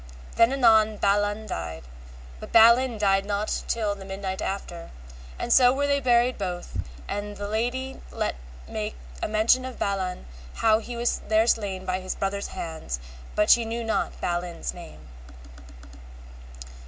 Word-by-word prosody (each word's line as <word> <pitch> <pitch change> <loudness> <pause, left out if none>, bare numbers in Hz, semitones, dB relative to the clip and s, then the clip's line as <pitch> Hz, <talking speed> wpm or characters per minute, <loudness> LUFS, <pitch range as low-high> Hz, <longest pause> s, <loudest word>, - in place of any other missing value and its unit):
Then 230 +2 +5
anon 220 -5 +4
Balan 205 +2 +1
died, 80 - -5 0.6
but - - -9
Balin 235 +2 +6
died 195 -2 +2
not 205 +1 -2
till 215 -3 0
the 200 -1 -10
midnight 190 0 -5
after, 175 -3 -5 0.5
and 240 - 0
so 250 -1 +7
were 280 +2 0
they 280 0 +2
buried 245 -2 +2
both, 180 -3 -5 0.3
and 205 0 -4
the 205 - -4
lady 245 +5 -2
let - - -1 0.3
make - - -4 0.3
a - - 0
mention 220 +4 +3
of 260 -1 -7
Balan 190 -2 -2 0.3
how 220 -1 +3
he 240 +2 -7
was 240 +1 0
there 220 +1 +4
slain 200 -5 0
by 185 0 -1
his 185 0 -4
brother's 200 +1 -2
hands, 160 - -5 0.4
but 210 0 +4
she 240 - +6
knew 230 +1 -3
not 225 -1 -1
Balin's 175 -1 -3
name. 170 - -12
210 Hz, 150 wpm, -26 LUFS, 190-235 Hz, 0.6 s, so